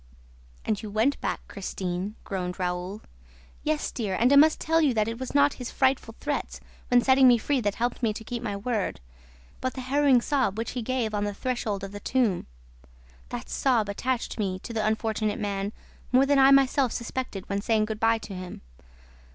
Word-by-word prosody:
'" - - -27
"And 210 -2 -1
you 215 - -6
went 220 +7 +1
back, - - -2
Christine," 190 0 -4
groaned 180 -2 -4
Raoul. 180 +3 -3 0.6
"Yes, 305 0 -1
dear, 205 -6 -2
and 245 +4 +4
I - - +7
must 305 +2 +6
tell 325 +1 +2
you 280 -6 +2
that 215 -1 +2
it 230 +1 -4
was 260 +1 -6
not 285 0 +5
his 245 - -4
frightful 260 -4 0
threats 290 -1 -3 0.3
when 245 -1 +4
setting 260 0 +6
me 245 -1 +7
free 265 +3 0
that 205 -2 -1
helped 240 +2 -2
me 230 -3 +2
to 220 - -8
keep 240 +1 -5
my 205 -4 -3
word, 215 -1 -2 0.6
but 255 - -2
the 260 - -4
harrowing 270 0 +4
sob 250 -6 0
which 225 0 -3
he 250 - -3
gave 235 -2 -1
on 205 0 0
the 205 -1 -2
threshold 220 -5 -2
of 195 - -5
the 205 - -7
tomb.... 225 -5 0 0.8
That - - -6
sob 235 -6 +1
attached 245 +4 -2
me 190 -3 -1
to 235 - -6
the 220 -1 -1
unfortunate 215 -1 0
man 200 0 -2 0.4
more 255 +2 +5
than 280 0 +3
I 270 0 +7
myself 275 -2 +4
suspected 235 -5 -4
when 200 0 -1
saying 215 0 +2
good 215 0 -5
by 225 0 +3
to 220 -2 -9
him. 185 -1 -7
225 Hz, 200 wpm, -27 LUFS, 205-260 Hz, 0.8 s, I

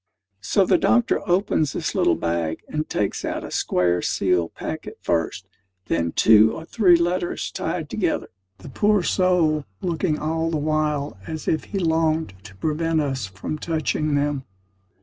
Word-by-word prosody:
So 185 - +2
the - - +3
doctor 240 -1 +2
opens 175 -6 +1
his - - -2
little - - +3
bag, 85 -1 -2
and 155 0 -3
takes 100 -2 -1
out - - -3
a - - -8
square 90 -1 +1
sealed 90 -3 0
packet - - -6
first; 85 +2 -1 0.4
then 85 0 0
two 110 +3 +5
or 160 - -8
three 185 -2 +4
letters 175 +1 -1
tied - - -3
together; - - -1 0.3
the - - -11
poor 205 +6 +2
soul 170 -5 +2 0.2
looking 170 -2 -1
all 160 +2 -1
the 165 - -1
while 150 -5 -1
as 155 -1 -6
if 155 - 0
he 200 - -5
longed 160 - +1
to 100 -2 -12
prevent 160 - 0
us 135 -7 -2
from 95 +11 -6
touching 155 -2 -1
them. 145 -1 0
155 Hz, 155 wpm, -23 LUFS, 105-165 Hz, 0.4 s, two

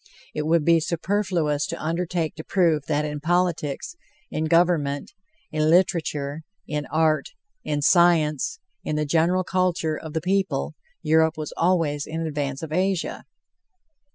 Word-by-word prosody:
It 150 0 -2
would 165 -2 +3
be 170 -1 +5
superfluous 170 -3 0
to - - -5
undertake 170 0 -2
to 155 - -8
prove 160 -7 +1
that 150 0 0
in 150 0 -4
politics, 175 - -1 0.4
in 155 - -1
government, 155 -4 +2 0.4
in 155 0 +1
literature, 160 -4 +1 0.3
in 150 -1 -3
art, 155 0 +1 0.3
in 145 -1 -2
science, 170 - +3 0.3
in 155 - -2
the 150 0 0
general 170 +5 +2
culture 180 -4 0
of 155 0 -8
the 160 - -1
people, 180 - 0 0.3
Europe 160 +1 +3
was 155 -1 -5
always 165 -5 +1
in 165 +1 -3
advance 145 -2 -3
of 160 - -6
Asia. 185 0 -1
160 Hz, 140 wpm, -24 LUFS, 150-175 Hz, 0.4 s, be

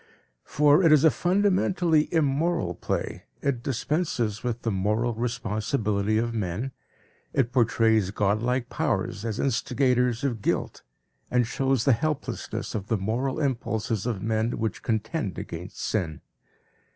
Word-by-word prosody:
For 150 +4 +4
it 165 - +6
is 150 -2 +6
a 160 - +7
fundamentally 180 -4 +2
immoral 155 - +1
play, - - -3 0.2
it 140 -4 0
dispenses 125 - -1
with 120 -1 -3
the 115 - 0
moral 105 +5 0
responsibility 110 -2 -1
of 115 +1 0
men, 110 +4 -2 0.6
it 125 -4 +1
portrays 115 -5 +3
godlike 110 +5 0
powers 100 - -1
as 110 -3 -3
instigators 125 -1 +1
of 120 -6 -1
guilt, - - -1 0.5
and 125 -1 +2
shows 135 0 0
the 135 - +6
helplessness 150 +5 -3
of 100 -2 -4
the 110 - +1
moral 120 +8 -1
impulses 115 -5 -1
of 105 -6 -2
men 110 +1 0
which 110 -1 -2
contend 110 - -2
against 85 +3 -7
sin. 85 -8 -2
120 Hz, 130 wpm, -26 LUFS, 110-140 Hz, 0.6 s, a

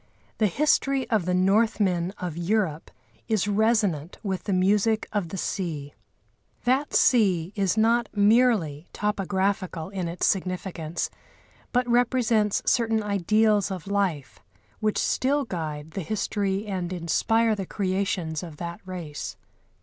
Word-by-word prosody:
The 215 - +4
history 275 - +1
of 210 -6 +2
the 180 0 +1
Northmen 190 -2 +2
of 175 -4 -4
Europe 175 -3 -1 0.4
is 215 -3 +1
resonant 205 -7 +1
with 190 -3 -3
the 205 - -1
music 205 +4 +2
of 200 -5 -1
the 195 - -5
sea. 155 -7 -3 0.7
That 265 +4 +1
sea 190 -7 +3
is 195 -1 +1
not 230 +2 +3
merely 205 - +3
topographical 190 -4 -1
in 190 -3 -3
its 170 +2 -2
significance, 180 -3 -2 0.6
but 250 0 +1
represents 235 -3 +2
certain 225 -2 +2
ideals 210 +1 +2
of 185 -4 -5
life 195 -8 -1 0.4
which 215 -1 0
still 280 +2 +1
guide 155 -6 -5
the 195 - -4
history 200 +1 -1
and 185 -4 -3
inspire 220 +6 +1
the 195 -3 -4
creations 185 -5 -1
of 165 -4 -9
that 170 +1 -6
race. 175 -5 -6
195 Hz, 125 wpm, -26 LUFS, 175-220 Hz, 0.7 s, The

